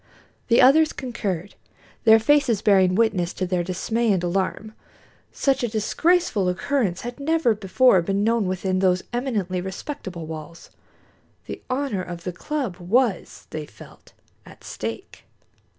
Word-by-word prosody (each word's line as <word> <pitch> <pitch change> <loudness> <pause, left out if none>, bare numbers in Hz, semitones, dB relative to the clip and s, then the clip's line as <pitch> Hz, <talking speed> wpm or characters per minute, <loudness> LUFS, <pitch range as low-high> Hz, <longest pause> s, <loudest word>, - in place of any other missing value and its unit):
The 235 +1 +5
others 310 +4 +5
concurred, 205 -7 -4 0.5
their 220 0 +8
faces 245 -2 +2
bearing 190 -3 +4
witness 200 -6 +1
to 185 - -3
their 180 -1 -1
dismay 220 +6 -1
and 185 -3 0
alarm. 195 +4 -2 0.6
Such 275 -1 0
a 240 - 0
disgraceful 225 - +1
occurrence 190 0 -1
had 240 +2 -7
never 315 -4 +2
before 205 0 +3
been 195 +4 -1
known 225 -2 +1
within 185 0 -1
those 185 -1 +2
eminently 210 -8 -2
respectable 190 - -6
walls. 160 +1 -9 0.7
The - - -7
honor 255 -7 -1
of 175 -2 -8
the 180 - -4
club 255 - -4
was, 200 +3 0
they 155 -1 -5
felt, - - -16 0.3
at - - -16
stake. - - -7
205 Hz, 135 wpm, -23 LUFS, 185-245 Hz, 0.7 s, their